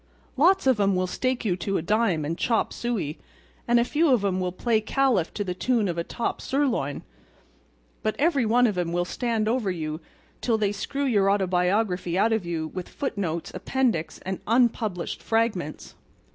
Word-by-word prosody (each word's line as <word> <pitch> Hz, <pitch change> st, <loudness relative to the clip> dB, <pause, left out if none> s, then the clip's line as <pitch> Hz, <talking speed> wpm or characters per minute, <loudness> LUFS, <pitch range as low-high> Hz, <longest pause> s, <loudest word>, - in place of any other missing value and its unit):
Lots 355 Hz, +7 st, +4 dB
of 260 Hz, -5 st, +3 dB
'em 200 Hz, -1 st, +3 dB
will 185 Hz, 0 st, +1 dB
stake 255 Hz, +6 st, -2 dB
you 185 Hz, -4 st, +2 dB
to 195 Hz, +2 st, -1 dB
a -, -, -3 dB
dime 200 Hz, -5 st, +1 dB
and 165 Hz, +3 st, -2 dB
chop 225 Hz, +5 st, 0 dB
suey; 210 Hz, -11 st, -3 dB, 0.5 s
and 240 Hz, 0 st, +4 dB
a 235 Hz, -, +2 dB
few 310 Hz, +5 st, +2 dB
of 230 Hz, -6 st, +3 dB
'em 190 Hz, -1 st, 0 dB
will 180 Hz, -1 st, -1 dB
play 220 Hz, +4 st, +1 dB
Caliph 235 Hz, -6 st, +1 dB
to 205 Hz, -, -1 dB
the 180 Hz, -2 st, -3 dB
tune 225 Hz, +3 st, +1 dB
of 170 Hz, -1 st, -2 dB
a -, -, 0 dB
top 235 Hz, -, -3 dB
sirloin; 255 Hz, -, -1 dB, 1.0 s
but 215 Hz, -, -1 dB
every 290 Hz, -3 st, +2 dB
one 240 Hz, +3 st, +4 dB
of 205 Hz, -6 st, 0 dB
'em 170 Hz, -1 st, -1 dB
will 175 Hz, 0 st, +1 dB
stand 225 Hz, +1 st, -1 dB
over 230 Hz, -3 st, +1 dB
you 160 Hz, -3 st, -4 dB, 0.4 s
till 230 Hz, -3 st, +1 dB
they 205 Hz, -2 st, +1 dB
screw 275 Hz, +7 st, -3 dB
your 205 Hz, -7 st, +3 dB
autobiography 185 Hz, -1 st, +1 dB
out 220 Hz, +3 st, +3 dB
of 210 Hz, -6 st, -1 dB
you 165 Hz, -2 st, -2 dB
with 185 Hz, -1 st, -5 dB
foot 285 Hz, -, -4 dB
notes, 170 Hz, -5 st, -3 dB
appendix 240 Hz, -12 st, -1 dB
and 190 Hz, 0 st, -3 dB
unpublished 225 Hz, -6 st, +1 dB
fragments. 225 Hz, -9 st, -1 dB
205 Hz, 185 wpm, -25 LUFS, 180-240 Hz, 1.0 s, Lots